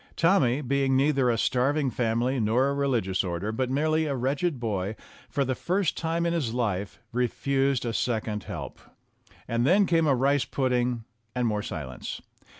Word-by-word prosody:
Tommy, 150 -7 +3
being 135 0 +1
neither 135 -2 +3
a 115 - +2
starving 135 +4 +1
family 120 +3 0
nor 120 +5 +2
a - - 0
religious 120 -10 0
order, 90 +3 -2
but 125 +3 -1
merely 155 +3 +1
a 140 - -1
wretched 135 +4 -1
boy, 105 -3 -2 0.3
for 140 - 0
the 130 - 0
first 180 +6 0
time 165 +1 -1
in 170 - +1
his 130 -9 -1
life 105 -5 -2
refused 135 +2 0
a 115 - -2
second 110 -3 -1
help. - - -6 0.7
And 115 0 0
then 190 +9 +5
came 165 -3 +2
a 140 - +4
rice 140 +2 +2
pudding 125 -3 0 0.3
and 125 -1 +1
more 105 -2 0
silence. 65 -9 -6
130 Hz, 165 wpm, -27 LUFS, 115-140 Hz, 0.7 s, then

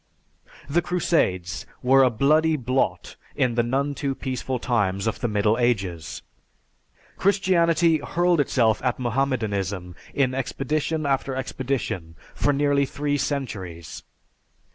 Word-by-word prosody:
The 160 +5 +2
Crusades 95 - 0 0.2
were 135 +2 +6
a 130 - +5
bloody 155 +7 +3
blot 125 -8 -1 0.2
in 125 -2 +1
the 120 - +2
none 135 +4 0
too 140 -1 -2
peaceful 130 -1 -3
times 100 -6 0
of 110 - -1
the 120 - -1
Middle 105 +1 +1
Ages. 95 -10 -1 0.9
Christianity 175 -4 +3
hurled 175 +1 +1
itself 115 -6 +2
at 125 -2 0
Mohammedanism 110 -8 -1 0.2
in 130 -2 +2
expedition 150 +4 -2
after 135 -1 0
expedition 130 -11 -3 0.2
for 145 - +1
nearly 140 -1 +2
three 145 +2 -1
centuries. 95 - -4
130 Hz, 120 wpm, -24 LUFS, 110-145 Hz, 0.9 s, were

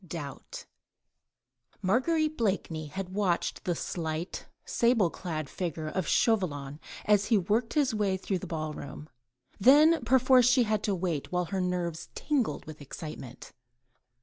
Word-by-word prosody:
DOUBT 150 -5 -7 1.2
Marguerite 310 - +2
Blakeney 190 - -1
had 185 +5 -5
watched 190 -4 -1
the 175 - 0
slight 160 +1 -4 0.2
sable 230 -7 +2
clad 155 -5 -4
figure 160 -1 -4
of 185 +2 -2
Chauvelin, 150 - +1 0.3
as 205 -1 +4
he 225 - +3
worked 215 - 0
his 285 -6 +2
way 200 -3 +1
through 190 0 -2
the 190 - -7
ball 155 -2 -3
room. 150 +1 -9 0.5
Then 295 +6 +6
perforce 255 0 +5
she 250 0 +5
had 220 - -4
had 215 -1 +1
to 200 - +1
wait, 170 -5 -2
while 180 0 0
her 190 +2 -2
nerves 175 -2 -2
tingled 260 - -1
with 155 -1 -10
excitement. 140 -3 -8
185 Hz, 145 wpm, -29 LUFS, 160-230 Hz, 1.2 s, Then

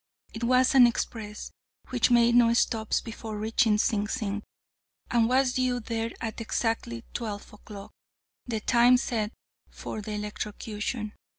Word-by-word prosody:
It 225 - -6
was 255 +2 +4
an 255 -3 +8
express, 215 -3 -4 0.4
which 250 -1 +2
made 235 -1 +5
no 235 -1 +5
stops 220 -2 +1
before 225 -1 -7
reaching 220 0 +2
Sing 210 -1 +1
Sing, 210 -3 -3 0.7
and 235 -1 +3
was 260 0 +3
due 255 -1 0
there 225 0 -3
at 225 -1 -5
exactly 225 - -2
twelve 210 -4 -5
o'clock, 205 -1 -11 0.6
the 225 -3 -2
time 245 +2 +5
set 225 -4 -2 0.4
for 215 - -7
the 210 +1 -6
electrocution. 210 +1 -4
225 Hz, 135 wpm, -27 LUFS, 210-240 Hz, 0.7 s, an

